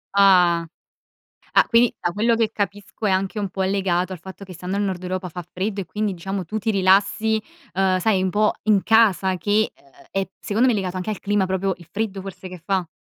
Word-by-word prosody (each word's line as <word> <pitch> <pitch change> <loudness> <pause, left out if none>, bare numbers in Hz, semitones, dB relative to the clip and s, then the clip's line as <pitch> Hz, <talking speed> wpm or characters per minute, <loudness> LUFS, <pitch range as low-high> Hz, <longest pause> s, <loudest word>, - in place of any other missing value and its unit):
Ah. 180 -4 +5 0.9
Ah, - - +6
quindi 235 0 +4
da 175 - -1
quello 230 +4 +2
che 225 -2 +1
capisco 205 +1 -4
è - - +2
anche 190 +3 0
un 200 - -2
po' 190 +1 -3
legato 190 -1 0
al 180 - -6
fatto 190 +2 -10
che 185 - -11
stando 180 +3 -4
al 205 - 0
nord 185 -2 -2
Europa 185 0 -3
fa 175 +1 -7
freddo, 195 +4 -4
e 180 - -6
quindi 210 +2 -2
diciamo 190 +2 -4
tu 215 +6 -3
ti 220 +2 -1
rilassi, 200 +3 +3 0.3
uhm, 190 -1 +2
sai 190 -1 +2
un 190 - 0
po' 210 +1 +2
in 210 -3 +3
casa 200 -5 +4
che, 210 +3 +1
ehm, 140 - -25 0.2
è 195 -1 -2
secondo 230 +5 +1
me 235 - +3
legato 185 -2 -2
anche 185 +4 -3
al 210 - -3
clima, 205 -2 +1
proprio 190 +1 0
il 170 -2 -16
freddo 200 -2 -3
forse 190 -1 -8
che 180 -2 -10
fa? 190 -3 0
195 Hz, 220 wpm, -22 LUFS, 185-210 Hz, 0.9 s, Ah